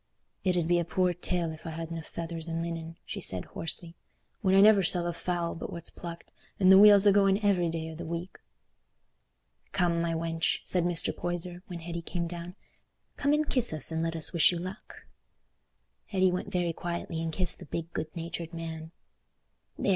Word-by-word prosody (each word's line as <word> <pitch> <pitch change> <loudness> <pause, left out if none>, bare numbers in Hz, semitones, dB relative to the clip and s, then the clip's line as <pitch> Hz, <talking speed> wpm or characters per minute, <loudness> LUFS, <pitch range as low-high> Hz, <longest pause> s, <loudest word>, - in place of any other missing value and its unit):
"It 185 -2 +1
ud 165 -2 +1
be 175 0 +3
a - - +1
poor 180 +1 +1
tale 175 -1 -2
if 160 +1 -10
I - - -3
hadna 165 +1 -5
feathers 165 0 -6
and 165 0 -2
linen," 165 -1 -5
she - - -6
said, 90 -1 +1
hoarsely, 165 +1 -4 0.5
"when 190 -3 +3
I - - +7
never 210 -1 +7
sell 175 -1 +1
a 175 - -1
fowl 175 0 -2
but - - -6
what's 170 - -7
plucked, 170 -1 -9 0.3
and 190 -1 +6
the 190 - +9
wheel's 205 -1 +8
a 205 - +7
going 195 0 +4
every 180 -4 +3
day 160 0 -4
o' - - -8
the 160 - -7
week." 170 +3 -5 1.3
"Come, 170 -2 +2
my 170 0 0
wench," 165 0 -1
said 180 -2 0
Mr. 175 -1 +2
Poyser, 175 0 -4
when 175 -2 -7
Hetty 170 0 -5
came 170 +1 -3
down, 170 +1 -7 0.6
"come 285 - +1
and 300 0 +1
kiss 240 -9 +5
us, 155 +1 -1
and 160 0 -1
let 165 0 -1
us 160 +2 0
wish 170 0 +6
you 175 - -3
luck." 185 +3 -8 1.0
Hetty 190 -2 +2
went 180 +2 -3
very 175 -3 0
quietly 170 -1 -4
and 165 0 -2
kissed 180 +2 +1
the - - -10
big 165 +3 -5
good 155 - -2
natured 170 0 -5
man. 160 -1 -6 0.9
"There!" - - -1
170 Hz, 200 wpm, -29 LUFS, 165-180 Hz, 1.3 s, the